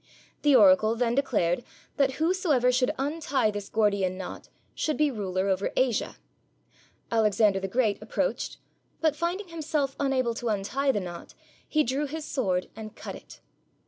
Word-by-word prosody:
The 290 -2 +5
oracle 270 -6 +6
then 235 0 +1
declared 240 -8 +1 0.3
that 275 -2 +2
whosoever 315 -5 +2
should 250 0 +2
untie 275 -5 0
this 205 -1 -6
Gordian 200 -4 +1
knot 185 - -8 0.2
should 310 - -1
be 300 -1 +3
ruler 190 -4 -2
over 190 0 0
Asia. 255 -4 +1 1.0
Alexander 215 -3 +3
the 195 - -3
Great 220 0 0
approached, - - -2 0.4
but, 315 -2 +2
finding 350 +4 -2
himself 305 -4 -2
unable 260 -4 +1
to 235 0 -3
untie 225 +7 0
the 210 - -1
knot, 175 -2 -8 0.3
he 305 -1 +2
drew 275 +4 -1
his 310 +2 -5
sword 190 -12 -1
and 220 0 -9
cut - - -7
it. - - -13
250 Hz, 150 wpm, -27 LUFS, 205-290 Hz, 1.0 s, oracle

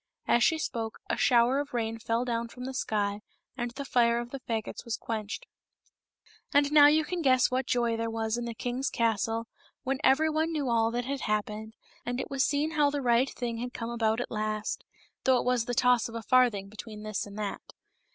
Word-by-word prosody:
As 240 - +4
she 320 - +4
spoke 225 -7 -3
a - - +1
shower 245 +2 +4
of 290 -2 -4
rain 225 -1 -2
fell 230 +2 -1
down 235 -1 -1
from 250 +2 -9
the 265 - -4
sky, 205 -4 -1 0.3
and 240 -2 -2
the 275 +4 -7
fire 235 -2 +3
of 240 0 -4
the 275 - -5
fagots 225 -4 -4
was 235 -2 -3
quenched. 215 -2 -4 1.1
And 285 -1 +3
now 295 -1 +8
you 305 +1 +4
can 355 +1 -3
guess 255 -4 +4
what 255 0 0
joy 235 -2 +1
there 230 0 -2
was 225 0 -1
in 240 0 -3
the 235 -1 -5
king's 250 +3 -2
castle 225 0 0 0.4
when 270 0 -1
every 285 +4 +4
one 315 +2 0
knew 290 -5 -1
all 225 -1 +3
that 240 +1 -2
had 275 0 -3
happened, 215 +1 -2 0.3
and 245 +1 -3
it 265 - -5
was 275 -1 +2
seen 300 +2 +1
how 300 -2 +3
the 290 0 -2
right 240 +2 +3
thing 235 -2 -4
had 245 +1 -5
come 230 0 -4
about 225 -1 +1
at 245 - -4
last, 215 -1 -2 0.4
though 260 -1 +4
it - - -1
was 250 -2 +2
the 245 - -2
toss 250 -2 +3
of 230 - -9
a 230 - -4
farthing 235 -5 +3
betwixt 215 +1 -9
this 215 -1 -3
and 200 0 -10
that. 210 -2 -3
240 Hz, 220 wpm, -29 LUFS, 225-265 Hz, 1.1 s, now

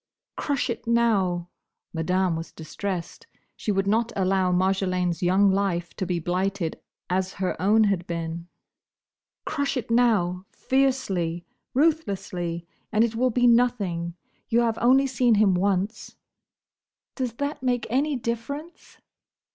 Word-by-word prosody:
"Crush 275 -3 -1
it 230 - -7
now!" 195 -7 +2 0.4
Madame 180 +2 +1
was 165 +1 -6
distressed. 185 - -5 0.3
She 215 - -2
would 195 -1 +1
not 225 +3 +1
allow 190 -1 +2
Marjolaine's 185 -1 +1
young 190 +2 +4
life 190 -3 -1
to 190 - -4
be 180 -1 0
blighted 180 +1 -2 0.3
as 185 +1 -1
her 190 -2 -2
own 215 +4 +4
had 195 -4 0
been. 170 0 -4 1.0
"Crush 280 -2 -1
it 230 -2 -4
now! 195 -6 +2
Fiercely! 195 -11 0 0.3
ruthlessly! 195 - 0 0.3
and 215 - +4
it 230 -1 0
will 250 +3 +2
be 245 +1 +2
nothing. 205 -9 +2 0.3
You 235 0 +3
have 230 -2 0
only 265 +3 +5
seen 250 -3 +3
him 205 -2 +4
once—" 195 +3 -1 1.0
"Does 255 -4 -3
that 285 +4 -3
make 245 -2 0
any 285 +4 +1
difference?" 250 +8 -5
200 Hz, 130 wpm, -25 LUFS, 180-240 Hz, 1.0 s, only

